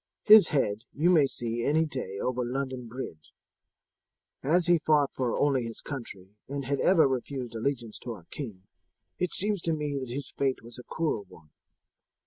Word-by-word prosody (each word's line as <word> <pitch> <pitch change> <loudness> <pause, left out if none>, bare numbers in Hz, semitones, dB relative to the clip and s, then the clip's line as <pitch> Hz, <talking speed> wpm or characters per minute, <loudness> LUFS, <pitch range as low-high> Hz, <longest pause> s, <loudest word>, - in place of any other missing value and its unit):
His 215 -4 +9
head 110 -5 0
you 165 +5 +3
may 155 -6 +5
see 120 -2 -2
any 155 +4 +3
day 130 -10 -4
over 125 +4 -1
London 130 0 -3
Bridge. 110 -10 -8 1.1
As 170 +5 +3
he 175 -1 +4
fought 150 -3 +3
only 130 +2 +2
for 115 - -4
his 115 - -7
country 105 -9 -7 0.2
and 140 0 -4
had 140 +1 -1
ever 170 -6 +5
refused 130 -1 -3
allegiance 115 -1 -2
to 120 - -5
our 90 -6 -13
king, 110 -10 -7 0.6
it 180 -1 0
seems 205 -1 +1
to 165 - 0
me 150 -2 -2
that 130 -2 -6
his 135 +2 -5
fate 135 -3 0
was 120 +1 -10
a - - -9
cruel 155 -11 -1
one. 75 -2 -17
135 Hz, 175 wpm, -28 LUFS, 120-150 Hz, 1.1 s, His